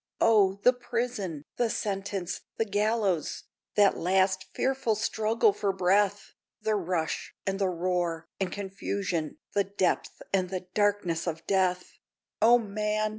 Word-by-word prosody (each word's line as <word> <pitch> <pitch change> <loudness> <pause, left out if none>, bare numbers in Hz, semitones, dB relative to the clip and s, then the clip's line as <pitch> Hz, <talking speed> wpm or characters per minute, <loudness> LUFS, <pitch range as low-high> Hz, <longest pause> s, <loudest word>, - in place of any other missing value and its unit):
O, 205 -4 +5
the 250 - +7
prison! 230 - -3
the 240 -2 +2
sentence! 195 -3 -3 0.2
the 225 - +1
gallows! 205 -5 0 0.3
That 205 -1 +5
last 190 +1 +2
fearful 265 -4 +1
struggle 220 0 +2
for 200 0 0
breath! 195 +2 +1 0.3
The 215 0 0
rush, 180 -5 -2
and 195 0 -1
the 195 -2 +2
roar, 175 -2 -1
and 190 -2 -1
confusion, 195 -4 -3 0.2
The 200 -1 +2
depth 190 -2 -1
and 185 -2 +2
the 185 -1 -3
darkness 205 -5 +1
of 165 -1 -3
death! 185 -2 0 0.4
O 235 +3 +7
man! 215 -1 -1
195 Hz, 130 wpm, -28 LUFS, 185-215 Hz, 0.4 s, the